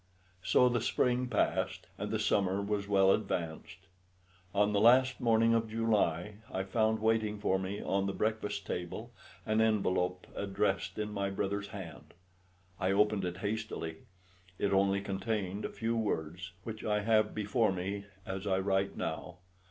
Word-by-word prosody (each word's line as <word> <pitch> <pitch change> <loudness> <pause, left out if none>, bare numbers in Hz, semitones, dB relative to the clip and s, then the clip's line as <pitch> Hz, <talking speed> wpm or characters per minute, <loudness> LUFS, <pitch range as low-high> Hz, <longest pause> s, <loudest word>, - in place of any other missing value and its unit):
So 125 +7 +4
the 120 -2 +1
spring 125 +1 +1
passed - - 0
and - - -4
the - - 0
summer 95 -1 +1
was 100 0 -2
well 95 -1 +5
advanced. 85 -7 -2 0.7
On 105 +1 +2
the 100 - +2
last 125 +3 +5
morning 115 -1 +4
of 115 -1 +1
July 105 -4 0
I 95 - -1
found 110 +3 +1
waiting 110 -1 +2
for 95 -2 +1
me 95 +2 -4
on 100 0 0
the - - 0
breakfast 105 -1 -2
table 90 -1 -5 0.3
an 110 +1 +2
envelope 95 -4 +1
addressed 100 0 -1
in 105 0 -3
my 100 -1 -1
brother's 100 +1 -2
hand. 95 -5 -9 0.6
I 95 -1 +1
opened 105 -1 +2
it 90 0 -3
hastily. 100 -7 -3 0.6
It 100 - 0
only 100 0 +3
contained 100 0 -2
a - - -2
few 115 0 -2
words, 90 -4 -2
which 110 0 -6
I 105 -1 +1
have 110 0 +2
before 110 +1 +1
me 100 +2 -3 0.2
as 95 +2 -4
I 95 -1 +2
write 95 0 0
now. 80 +3 -4
100 Hz, 155 wpm, -32 LUFS, 95-110 Hz, 0.7 s, well